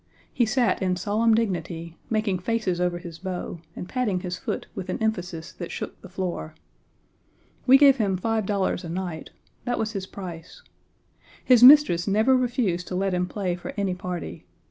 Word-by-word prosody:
He 240 - +2
sat 240 0 +1
in 185 -1 +1
solemn 215 +5 +2
dignity, 170 -6 -2
making 215 -4 0
faces 185 -3 -1
over 180 -1 0
his 170 -2 -9
bow, 180 -2 -5 0.2
and 180 - -6
patting 210 -8 -1
his 180 -1 -4
foot - - -4
with 190 -2 -6
an - - -1
emphasis 180 -6 -3
that 175 - -7
shook - - -6
the 190 - -11
floor. 180 -4 -4 1.1
We 265 +1 +9
gave 275 -1 +6
him 200 -5 +1
five 220 +1 -1
dollars 195 -2 0
a 170 - -6
night; 175 -2 -5 0.4
that 245 - -1
was 220 -1 -1
his 195 -3 -5
price. 175 -5 -9 0.8
His 250 -3 +6
mistress 250 - +8
never 220 +6 +4
refused 240 -8 0
to 180 - -4
let 195 0 0
him 180 0 0
play 185 -3 -2
for 175 - -8
any 195 -2 0
party. 180 -1 -6
190 Hz, 175 wpm, -25 LUFS, 180-220 Hz, 1.1 s, We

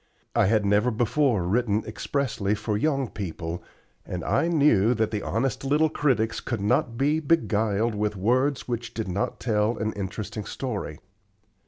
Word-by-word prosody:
I - - +4
had 105 0 +2
never 105 +4 +3
before 120 -1 +1
written 105 +3 +1
expressly 110 -7 -1
for 105 0 -2
young 135 +3 +1
people, 85 -4 -5 0.4
and 90 -2 -5
I 115 +10 +1
knew 140 - +4
that 110 -1 0
the 105 -2 -2
honest 130 +5 -1
little 150 +3 +3
critics 115 -6 +1
could 120 -4 -3
not 110 +3 +1
be 145 +4 +2
beguiled 115 -8 +1
with 105 0 -1
words 130 +8 +1
which 120 -2 -4
did 110 -3 -3
not 95 +2 -2
tell 110 0 +1
an 110 0 -2
interesting 105 +1 -5
story. 105 - -4
110 Hz, 155 wpm, -26 LUFS, 105-130 Hz, 0.4 s, I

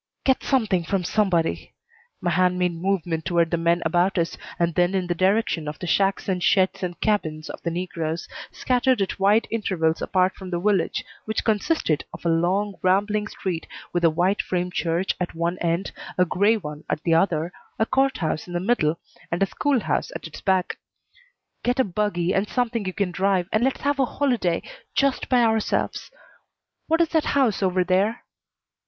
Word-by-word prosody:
"Get 265 -1 +2
something 215 -10 +1
from 185 +2 -1
somebody." 175 -4 0 0.5
My 175 - 0
hand 180 +2 +2
made 180 -1 +1
movement 170 -2 -1
toward 170 -1 +1
the 170 - +1
men 170 +1 +1
about 175 +4 +2
us 170 -1 0 0.2
and 170 -1 +1
then 175 +3 +2
in 185 -1 0
the 175 - 0
direction 185 -3 +1
of 150 0 -5
the - - -6
shacks 195 +3 +1
and 185 -2 0
sheds 190 +1 +2
and 175 -2 -4
cabins 155 -8 -1
of - - -10
the 170 - -2
negroes, 165 -2 -3 0.2
scattered 255 -1 +1
at 195 - -5
wide 205 +4 +3
intervals 180 -8 0
apart 185 0 +2
from 190 -2 -9
the 175 -1 -1
village, 195 -1 +1 0.2
which 220 - -2
consisted 215 - +1
of - - -13
a - - +3
long, 185 +5 +1
rambling 205 +3 +2
street 180 -6 -4 0.3
with 175 -1 0
a 165 - +6
white 180 +5 +1
frame 180 0 -2
church 170 +2 0
at 175 - -3
one 170 +2 -1
end, 170 +3 -1 0.3
a 180 - +4
gray 205 +6 +3
one 150 -5 -7
at 155 - -2
the 165 - +2
other, 165 0 +1 0.2
a 220 - +2
court 270 +2 +1
house 160 -1 -2
in 175 - -8
the 175 - 0
middle, 175 -6 +1 0.3
and 170 +3 +1
a - - +5
school 270 +5 0
house - - -1
at - - -6
its - - -9
back. 190 -2 0 0.8
"Get 245 +2 0
a - - +6
buggy 185 -3 -1
and 195 +2 0
something 240 -4 -1
you 185 - -2
can 200 -3 -1
drive 190 -1 +1
and 215 +2 +2
let's 265 +1 0
have 285 0 0
a 265 - +4
holiday 245 -11 0 0.3
just 275 -1 +1
by 250 -2 +4
ourselves. 220 -2 0 0.8
What 325 +1 +3
is 330 - +2
that 320 -2 +1
house 250 -8 +2
over 185 -1 +2
there?" 195 +6 +1
185 Hz, 190 wpm, -24 LUFS, 170-215 Hz, 0.8 s, a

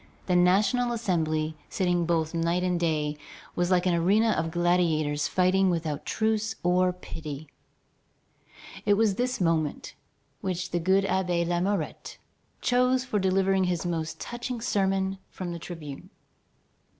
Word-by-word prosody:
The 180 - +1
National 200 +7 +3
Assembly, 160 -8 -1
sitting 175 -3 0
both 160 -2 +1
day 170 +1 0
and 180 -1 0
night, 150 -3 0 0.4
was 175 0 0
like 180 -1 +3
an 180 - +3
arena 200 +7 +3
of 165 - 0
gladiators 165 -4 +1
fighting 185 +1 +3
without 160 -4 -2
truce 220 0 0
or 180 +1 +3
pity. 155 -4 -8 1.3
It 205 - +4
was 215 -1 +3
this 250 +5 -1
moment 165 -4 0 0.5
which 180 -2 -3
the 175 - 0
good 190 +3 +3
Abbé 180 -3 0
Lamourette 175 0 -2 0.4
chose 250 +1 +2
for 215 -5 0
delivering 190 0 +2
his 180 -1 -1
most 165 -2 -3
touching 240 0 -5
sermon 195 -3 0
from 175 -2 -5
the 170 - -6
tribune. 155 -5 -8
180 Hz, 135 wpm, -27 LUFS, 165-195 Hz, 1.3 s, It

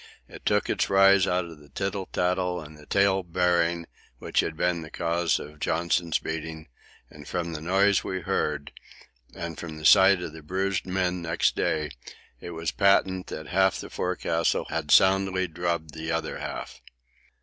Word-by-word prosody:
It - - -10
took - - +2
its - - 0
rise 95 -1 +5
out 90 0 +1
of 80 -3 -11
the 75 -1 -18
tittle 95 +4 -3
tattle 90 0 0
and 75 -1 -12
tale 100 -1 +3
bearing 85 -1 +1 0.3
which - - -1
had 80 - 0
been 90 -1 0
the 80 - -9
cause 85 0 0
of 75 +1 -10
Johnson's 85 +1 0
beating, 80 -1 -6 0.4
and 75 -1 -13
from 85 -1 -3
the 75 - -5
noise 95 +4 +3
we 95 -1 -3
heard, 75 -3 -2 0.6
and 85 -1 -6
from 80 -2 -7
the 75 - -8
sight 95 0 +7
of 75 - -6
the 80 - -10
bruised 95 +4 -2
men 90 -1 -1
next 80 -2 +1
day, 75 -2 -1 0.5
it - - -8
was 80 -1 -3
patent 95 -2 +2
that 80 0 -7
half 95 0 +2
the - - -8
forecastle 85 -2 0
had 80 -3 -3
soundly 95 0 +4
drubbed 85 -2 -3
the 80 +1 -4
other 80 0 -2
half. - - -6
85 Hz, 170 wpm, -26 LUFS, 80-95 Hz, 0.6 s, sight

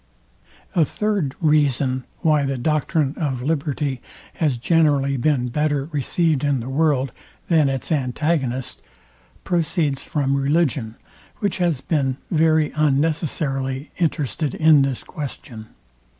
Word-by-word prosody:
A 170 - +4
third 195 -5 -1
reason 140 -4 +2 0.2
why 155 -4 +3
the 135 -1 -1
doctrine 150 +1 0
of 135 -6 -2
liberty 145 -3 -1 0.4
has 150 -7 +1
generally 140 -1 +2
been 130 -2 +1
better 145 +1 0
received 150 +1 +1
in 140 -2 +1
the 120 +2 -6
world, 140 -3 +1 0.4
than 155 -5 +4
its 135 +4 -3
antagonist, 135 -2 -1 0.6
proceeds 165 -5 0
from 140 -4 0
religion, 140 -5 0 0.4
which 200 -3 -1
has 170 -7 +1
been 135 -4 0
very 160 -2 +3
unnecessarily 145 -2 0
interested 155 -3 -1
in 155 -2 +5
this 135 -2 -1
question. 130 -8 -7
145 Hz, 115 wpm, -22 LUFS, 135-160 Hz, 0.6 s, in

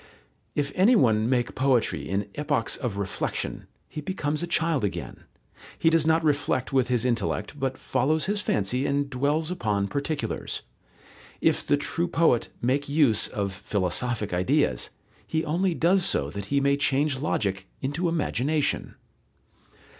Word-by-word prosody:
If 145 -1 0
any 210 +7 +5
one 110 - +3
make 120 -2 +1
poetry 130 -3 +1
in 100 +2 -1
epochs 145 -6 -1
of 115 -6 -4
reflexion, 100 -1 -3 0.2
he 150 - -6
becomes 150 -3 -2
a 175 - -2
child 165 -5 +1
again; 100 - -4 0.5
he 165 - +3
does 165 -1 +3
not 160 0 +3
reflect 145 -4 0
with 130 -2 +3
his 125 -1 +1
intellect, 120 +4 -1
but 135 -1 -1
follows 155 +5 0
his 205 +1 -1
fancy 125 - 0
and 140 0 0
dwells 145 +5 0
upon 105 - 0
particulars. 140 +7 -3 0.8
If - - +2
the 145 - +4
true 165 +4 -1
poet 165 -8 +2
make 140 +4 +1
use 140 -8 +3
of 100 -2 -3
philosophic 100 +3 -1
ideas, 90 +1 +1 0.4
he 160 0 -1
only 175 +3 +1
does 180 +4 +3
so 70 - +2
that 100 +3 -5
he 140 +6 +1
may 140 0 +2
change 140 -1 +1
logic 95 -9 -1
into 145 +6 -1
imagination. 150 -2 0
140 Hz, 145 wpm, -26 LUFS, 115-155 Hz, 0.8 s, any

